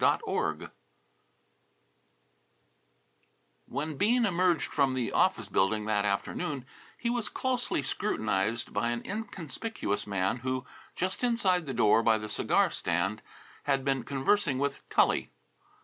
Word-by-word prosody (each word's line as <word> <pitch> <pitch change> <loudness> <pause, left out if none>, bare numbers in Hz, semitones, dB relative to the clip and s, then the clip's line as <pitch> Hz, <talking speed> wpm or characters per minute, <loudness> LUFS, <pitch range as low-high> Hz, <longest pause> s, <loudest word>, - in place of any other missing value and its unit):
XII - - +1 3.0
When 150 0 -3
Bean 235 - +3
emerged 180 -3 +2
from 135 -3 +2
the 125 -2 -1
office - - +2
building 105 +3 +1
that 105 -1 +1
afternoon 125 +6 -2 0.3
he 235 - -1
was 240 -3 -1
closely 250 - -1
scrutinized 110 -2 -1
by 110 +4 +1
an 120 0 -2
inconspicuous 200 - -4
man 95 +2 0
who, 130 +1 -3 0.3
just 185 +6 -2
inside 190 -9 +2
the 135 - -2
door 115 -1 +5
by 115 -1 +4
the 105 -1 -6
cigar 105 - +2
stand, 95 +5 -1 0.4
had 135 -1 +1
been 135 -2 +1
conversing 140 - +1
with 140 +1 -1
Tully. - - +3
135 Hz, 120 wpm, -29 LUFS, 110-185 Hz, 3.0 s, door